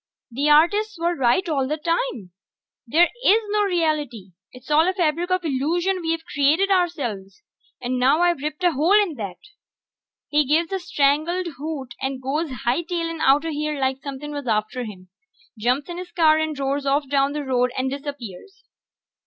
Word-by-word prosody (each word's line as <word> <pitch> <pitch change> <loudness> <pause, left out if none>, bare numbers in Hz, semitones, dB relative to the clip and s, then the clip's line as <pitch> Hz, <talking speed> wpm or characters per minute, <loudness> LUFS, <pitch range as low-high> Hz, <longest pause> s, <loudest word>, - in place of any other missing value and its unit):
"The 280 +5 0
artists 405 +8 +4
were 340 +1 0
right 265 +7 +2
all 275 -5 0
the 305 +3 -2
time... 330 - -2 0.6
there 335 +8 +5 0.2
is 435 0 +5
no 420 0 +1
reality! 300 - -1 0.2
It's 255 +4 -12
all 315 +3 +5
a - - 0
fabric 340 0 0
of 365 -1 0
illusion 340 +7 0
we've 325 0 -2
created 310 +8 +2
ourselves! 275 - -1 0.4
And 250 +1 -2
now 275 +6 +3
I've 345 -5 +2
ripped 305 +3 -4
a 355 - +4
hole 330 +9 +4
in 400 -6 0
that!" 200 -5 -5 0.9
He 300 0 +3
gives 320 +5 +1
a 385 - 0
strangled 330 +3 +1
hoot 285 -5 -5
and 265 0 -2
goes 290 +5 -2 0.2
hightailin' 330 +5 -1
outta 290 +4 +3
here 300 -1 -2
like 265 0 -1
somepin' 285 +1 -6
was 285 -3 -6
after 220 +3 -1
him. 185 -4 -11 0.5
Jumps 250 +6 0
in 350 0 -6
his 360 -1 -8
car 315 -2 +4
and 315 -2 -2
roars 275 +1 -2
off 280 +1 +1
down 275 +1 +1
the 300 0 -3
road 250 -1 +1
and 260 0 -1
disappears. 280 - -8
300 Hz, 170 wpm, -23 LUFS, 265-340 Hz, 0.9 s, there